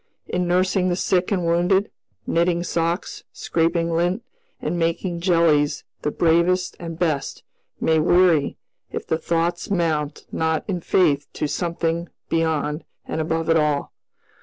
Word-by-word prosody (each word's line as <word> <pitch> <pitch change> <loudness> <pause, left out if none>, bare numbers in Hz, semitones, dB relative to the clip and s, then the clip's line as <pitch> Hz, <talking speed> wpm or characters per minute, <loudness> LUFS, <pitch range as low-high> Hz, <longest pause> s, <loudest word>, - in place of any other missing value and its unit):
In 180 0 -1
nursing 185 +1 +2
the 175 - +1
sick 180 +1 +1
and 180 -4 +1
wounded, 175 +4 +2 0.3
knitting 170 +1 +1
socks, 170 +1 -2
scraping 165 0 0
lint, 175 +7 0 0.4
and 175 - -2
making 170 +1 -1
jellies 165 -5 +2 0.2
the - - 0
bravest 170 +4 +2
and 165 -2 -6
best 155 -6 -1 0.4
may 160 0 +3
weary 175 -2 +3 0.3
if - - -4
the 160 - -1
thoughts 170 +1 -1
mount 160 -6 -1
not 160 -1 0
in 180 -4 -2
faith 145 -6 +2
to - - -2
something 170 +1 -2 0.2
beyond 160 -2 0 0.2
and 160 - -2
above 160 +1 -1
it 165 0 +4
all. 150 -2 0
170 Hz, 135 wpm, -22 LUFS, 160-175 Hz, 0.4 s, it